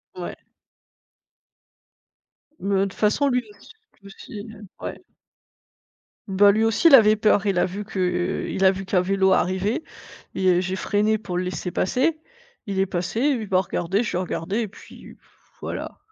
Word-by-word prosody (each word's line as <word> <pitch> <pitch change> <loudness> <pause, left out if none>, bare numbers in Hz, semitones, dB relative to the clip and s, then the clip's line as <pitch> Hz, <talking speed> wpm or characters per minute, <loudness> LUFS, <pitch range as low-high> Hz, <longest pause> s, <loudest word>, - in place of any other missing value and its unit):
Ouais. - - -6 2.2
Mmh, 200 - -3
heu, 195 - +3
toute 195 - -10
façon 215 +7 +1
lui 250 -1 +1
aus 205 - -17 0.4
lui 200 - -14
aussi, 205 +1 -10
heu, 215 -1 -12 0.2
ouais. - - -6 1.3
Bah 200 +1 +5
lui 220 +2 +1
aussi, 225 +9 +4
il 280 - +10
avait 215 -4 +6
peur, 210 -1 +2
il 195 -3 +1
a - - +3
vu 200 +3 -6
que 180 -3 -1
il 190 - 0
a 190 - +7
vu 195 0 -6
qu'un 185 0 +1
vélo 190 +1 +2
arrivait 190 - +1 0.5
et 190 -1 +2
heu, - - +2
j'ai 185 +1 -3
freiné 210 +3 +1
pour 185 -4 -5
le 180 - 0
laisser 180 0 -4
passer. 275 - 0 0.5
Il 195 -3 -3
est 195 - +3
passé, 180 +4 -3
il 260 -6 +1
m'a 185 -1 +3
regardée, 190 +3 -1
je 230 - -3
l'ai 180 - 0
regardé 185 +3 -3
et 225 - -1
puis, 205 - -14
pfff, - - -32
voilà. - - -6
195 Hz, 180 wpm, -23 LUFS, 185-215 Hz, 2.2 s, il